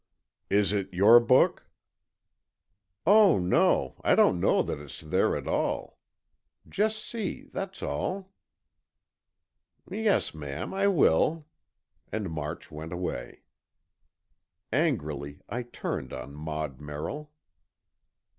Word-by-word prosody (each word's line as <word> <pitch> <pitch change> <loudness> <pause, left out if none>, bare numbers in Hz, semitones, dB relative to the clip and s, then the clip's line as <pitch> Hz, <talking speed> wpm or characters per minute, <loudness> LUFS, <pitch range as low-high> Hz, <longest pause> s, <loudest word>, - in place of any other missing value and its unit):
"Is 100 -1 +3
it 100 -2 -2
your 100 +6 +7
book?" 125 +2 +3 1.4
"Oh, 205 -1 +6
no, 90 -7 +2
I - - +4
don't 90 - +4
know - - +3
that - - -4
it's 70 -2 -9
there 75 -1 +1
at - - -7
all. - - -2 0.7
Just 215 +1 -1
see, 220 -5 -4
that's 195 0 -5
all." 190 +1 -3 1.6
"Yes, 215 -2 +1
ma'am, 75 +2 -6
I 195 +1 +2
will," 160 - +3 0.7
and 105 -6 -3
March 75 -1 -5
went 80 +2 -7
away. 75 -9 -5 1.3
Angrily, 70 -1 -1
I 120 +4 -3
turned 120 - -5
on 65 +2 -7
Maud 75 -2 -5
Merrill. 80 - -6
95 Hz, 105 wpm, -28 LUFS, -, 1.6 s, your